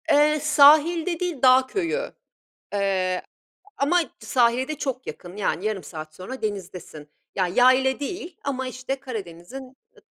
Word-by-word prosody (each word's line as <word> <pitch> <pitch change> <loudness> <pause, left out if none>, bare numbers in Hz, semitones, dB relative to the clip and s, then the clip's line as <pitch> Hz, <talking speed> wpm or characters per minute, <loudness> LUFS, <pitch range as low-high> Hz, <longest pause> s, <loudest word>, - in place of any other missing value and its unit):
Eee, 300 +1 +4
sahilde 310 +4 +5
değil, 350 -7 -3
dağ 260 0 +6
köyü, 395 - -2 0.6
eee, 190 -2 0
a - - -31 0.5
ama 325 +6 +3 0.2
sahile 245 +1 +1
de 310 - -4
çok 260 -2 -4
yakın, 180 +2 -8
yani, 195 -2 -1
yarım 215 -3 -2
saat 155 -2 -9
sonra 225 +10 -8
denizdesin, 180 -7 -6 0.3
ya, 185 -2 +1
yayla 255 +6 +3
değil 340 +3 -6
ama, 260 -2 -3
işte, 255 +2 -5
Karadeniz'in, 255 +2 -8 0.2
ı - - -19
260 Hz, 140 wpm, -24 LUFS, 195-295 Hz, 0.6 s, dağ